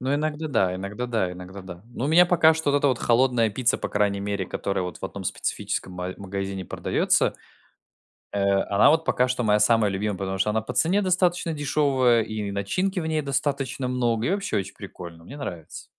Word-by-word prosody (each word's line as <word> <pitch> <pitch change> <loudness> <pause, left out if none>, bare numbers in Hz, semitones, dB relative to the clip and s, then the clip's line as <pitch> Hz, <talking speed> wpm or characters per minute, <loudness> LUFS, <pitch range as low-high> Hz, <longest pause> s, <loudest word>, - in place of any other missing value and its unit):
Ну, 130 +2 0
иногда 155 +1 -2
да, 95 -9 +1
иногда 100 +6 -4
да, 110 -7 -1
иногда 90 +2 -9
да. 90 -1 -10
Но 125 - -2
у - - -1
меня 175 +3 +6
пока 165 -2 +5
что 160 -2 -1
вот 145 - +3
эта 145 - +2
вот 130 -3 0
холодная 120 -1 +3
пицца, 115 +3 0
по - - -3
крайней 100 -1 0
мере, 100 -1 -2
которая 100 +1 -2
вот 90 0 -6
в - - -7
одном 95 0 -6
специфическом 95 - -3
ма 90 +1 -5
магазине 95 -1 -5
продаётся. - - +1 1.0
Э, 100 -1 +2
она 100 +7 +5
вот 160 +1 +2
пока 125 -4 +2
что 125 0 -1
моя 105 -1 +3
самая 110 -1 +4
любимая, 100 0 -2
потому 95 0 -3
что 100 - +2
она 110 +1 +1
по 110 - -6
цене 185 +5 +3
достаточно 180 -2 +1
дешёвая, 140 -5 +2
и 105 -2 -4
начинки 180 - -1
в 160 - -4
ней 155 -1 0
достаточно 135 -2 -2
много, 120 -2 0
и - - +1
вообще 200 - -1
очень 95 -1 -5
прикольно, 85 -1 -10
мне 140 +10 -10
нравится. 85 - -7
115 Hz, 205 wpm, -25 LUFS, 100-145 Hz, 1.0 s, меня